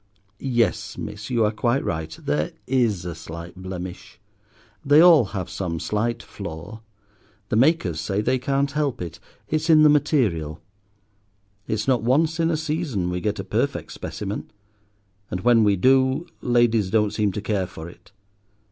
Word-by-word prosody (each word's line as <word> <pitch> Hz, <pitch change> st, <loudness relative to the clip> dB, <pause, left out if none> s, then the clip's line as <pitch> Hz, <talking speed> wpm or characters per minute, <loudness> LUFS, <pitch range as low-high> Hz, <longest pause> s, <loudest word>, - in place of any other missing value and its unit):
Yes, 120 Hz, -4 st, 0 dB
miss, -, -, -6 dB
you 115 Hz, -3 st, +2 dB
are 105 Hz, -, +1 dB
quite 120 Hz, +4 st, 0 dB
right, 80 Hz, -2 st, -2 dB, 0.2 s
there 75 Hz, +2 st, -1 dB
is 115 Hz, -9 st, +1 dB
a 85 Hz, -, -4 dB
slight 85 Hz, +1 st, -9 dB
blemish. 95 Hz, -1 st, -8 dB, 0.6 s
They 145 Hz, +2 st, +6 dB
all 165 Hz, -7 st, +7 dB
have 95 Hz, -3 st, -5 dB
some 85 Hz, -4 st, -4 dB
slight 115 Hz, +6 st, -1 dB
flaw. 100 Hz, +3 st, -8 dB, 0.7 s
The -, -, 0 dB
makers 115 Hz, -, +2 dB
say 95 Hz, +4 st, -1 dB
they 125 Hz, +4 st, +1 dB
can't 140 Hz, +2 st, 0 dB
help 145 Hz, -3 st, -1 dB
it—it's 90 Hz, -, -5 dB
in 155 Hz, -1 st, +7 dB
the 155 Hz, -, +7 dB
material. 110 Hz, -, +1 dB, 1.1 s
It's 110 Hz, +1 st, -2 dB
not 130 Hz, -3 st, +3 dB
once 155 Hz, +8 st, +2 dB
in 165 Hz, 0 st, +2 dB
a 165 Hz, -, +1 dB
season 150 Hz, -, -2 dB
we 90 Hz, 0 st, -3 dB
get 105 Hz, +3 st, -1 dB
a -, -, -4 dB
perfect -, -, -2 dB
specimen; 105 Hz, +1 st, -5 dB, 0.8 s
and 90 Hz, -, -3 dB
when 120 Hz, 0 st, +5 dB
we 100 Hz, -1 st, +4 dB
do 130 Hz, -, +3 dB, 0.2 s
ladies 120 Hz, -5 st, +2 dB
don't 105 Hz, 0 st, +2 dB
seem 105 Hz, -2 st, +1 dB
to -, -, -3 dB
care 100 Hz, -3 st, -1 dB
for 80 Hz, -3 st, -9 dB
it. 90 Hz, -, -15 dB
110 Hz, 155 wpm, -23 LUFS, 90-135 Hz, 1.1 s, all